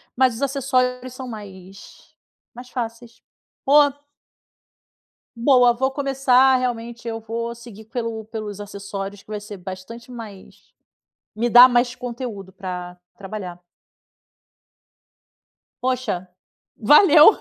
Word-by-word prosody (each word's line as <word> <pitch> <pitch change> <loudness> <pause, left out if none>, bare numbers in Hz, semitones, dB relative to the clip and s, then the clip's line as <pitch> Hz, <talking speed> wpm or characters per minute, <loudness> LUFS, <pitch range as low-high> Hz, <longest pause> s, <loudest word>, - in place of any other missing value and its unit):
Mas 255 -2 +3
os 235 - -8
acessórios 255 -2 0
são 255 0 -8
mais 195 -4 -12 0.4
mais 250 +1 -11
fáceis. 235 -1 -6 0.4
O 275 - -1 1.7
Boa, 245 -1 +5
vou 265 +3 0
começar, 265 -2 +3
realmente, 235 -1 -3
eu 225 0 -4
vou 230 +1 -4
seguir 230 -2 -12
pelo 230 -1 -4
pelos 215 -2 -6
acessórios, 200 0 -7
que - - -32
vai 210 -1 -5
ser 205 -1 -9
bastante 190 +7 -9
mais 220 -6 -12 0.6
me 235 +2 0
dá 245 +2 +10
mais 245 0 +2
conteúdo 235 -6 -6
pra 180 -1 -7 0.2
trabalhar. 190 -3 -7 2.2
Poxa, 250 -8 -1 0.5
valeu! 300 - +7
235 Hz, 105 wpm, -22 LUFS, 205-255 Hz, 2.2 s, dá